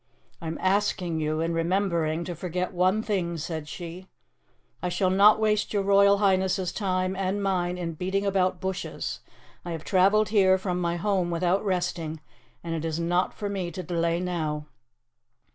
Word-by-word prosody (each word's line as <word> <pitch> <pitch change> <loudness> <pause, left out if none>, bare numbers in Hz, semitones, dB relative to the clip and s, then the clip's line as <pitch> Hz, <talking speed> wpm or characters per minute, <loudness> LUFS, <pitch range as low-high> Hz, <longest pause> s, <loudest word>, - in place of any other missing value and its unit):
"I 165 - -5
am 160 - -3
asking 185 -4 +1
you, 155 +1 -1
in 165 +1 0
remembering, 170 -2 0
to 175 - -4
forget 180 +2 -3
one 185 +4 +2
thing," 175 -6 -1
said 160 -1 -5
she. 175 +3 -8 0.7
"I 180 - -1
shall 185 +1 +1
not 205 +3 +6
waste 215 -1 +1
your 200 -1 +1
Royal 200 0 +5
Highness's 190 -2 +1
time 185 -2 -1
and 195 +1 -1
mine 180 -2 0
in 170 -2 -3
beating 190 +5 -1
about 185 -2 +1
bushes. 190 +1 -4 0.4
I 175 - -4
have 160 - -6
travelled 200 +2 +3
here 190 -3 +4
from 180 -2 -2
my 170 0 0
home 185 -1 0
without 175 +3 +1
resting, 175 -5 -2 0.4
and 170 -1 -3
it 160 -1 -3
is 165 0 -2
not 175 +2 0
for 205 - -4
me 195 -3 -3
to 180 +2 -6
delay 170 -1 0
now." 160 -4 -2
180 Hz, 170 wpm, -26 LUFS, 170-195 Hz, 0.7 s, not